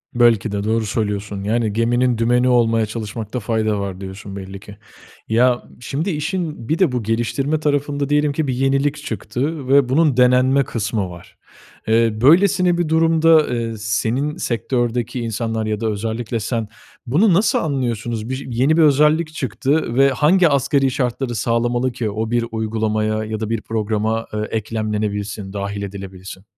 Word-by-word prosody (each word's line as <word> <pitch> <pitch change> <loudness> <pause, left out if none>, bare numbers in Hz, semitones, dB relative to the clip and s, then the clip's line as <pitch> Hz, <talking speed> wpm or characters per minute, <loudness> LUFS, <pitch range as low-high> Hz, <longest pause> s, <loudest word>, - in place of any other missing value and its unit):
Belki 115 -3 +3
de 100 0 -2
doğru 110 +1 0
söylüyorsun. 105 -2 -3
Yani, 110 0 0
geminin 120 +2 +1
dümeni 120 +2 +2
olmaya 115 -2 +3
çalışmakta 110 +2 -5
fayda 110 -1 -1
var 100 -1 -5
diyorsun 95 +1 -8
belli 95 0 -8
ki. 100 0 -13 0.5
Ya, 120 +2 +2 0.2
şimdi 140 +8 -3
işin 150 - -3
bir 160 - 0
de 185 -8 +3
bu 125 -2 -2
geliştirme 120 +7 -1
tarafında 145 -1 -1
diyelim 150 0 +2
ki 155 0 -1
bir 130 - 0
yenilik 135 +3 +1
çıktı 140 +2 -3
ve 135 -1 +4
bunun 145 -1 +2
denenme 130 +2 +4
kısmı 105 -5 -2
var. 85 -1 -13 0.5
Eee, 115 -1 +2
böylesine 175 +4 +4
bir 175 -3 -1
durumda, 160 -1 +4
eee, 115 -2 -3
senin 115 +7 -1
sektördeki 120 +1 -1
insanlar 115 -1 -2
ya 105 -1 -2
da 115 - -1
özellikle 110 +2 -3
sen, 115 0 -2 0.4
bunu 175 - +3
nasıl 200 +6 +3
anlıyorsunuz? 120 -6 -2
Bir 130 +1 -4
yeni 135 +7 +2
bir - - +5
özellik 155 +2 +3
çıktı 135 0 -1
ve 135 +1 +5
hangi 160 +6 +3
asgari 140 -1 +2
şartları 125 0 -2
sağlamalı 120 +3 0
ki 120 -3 -3
o 110 +2 -3
bir 120 -1 +1
uygulamaya 110 -1 -1
ya 110 0 -4
da 110 -1 -3
bir 115 -1 -1
programa, 110 +1 -1
eee, 105 - -2
eklemlenebilsin, 105 -2 -3
dâhil 100 0 -4
edilebilsin? 95 -1 -8
120 Hz, 155 wpm, -20 LUFS, 110-140 Hz, 0.5 s, bir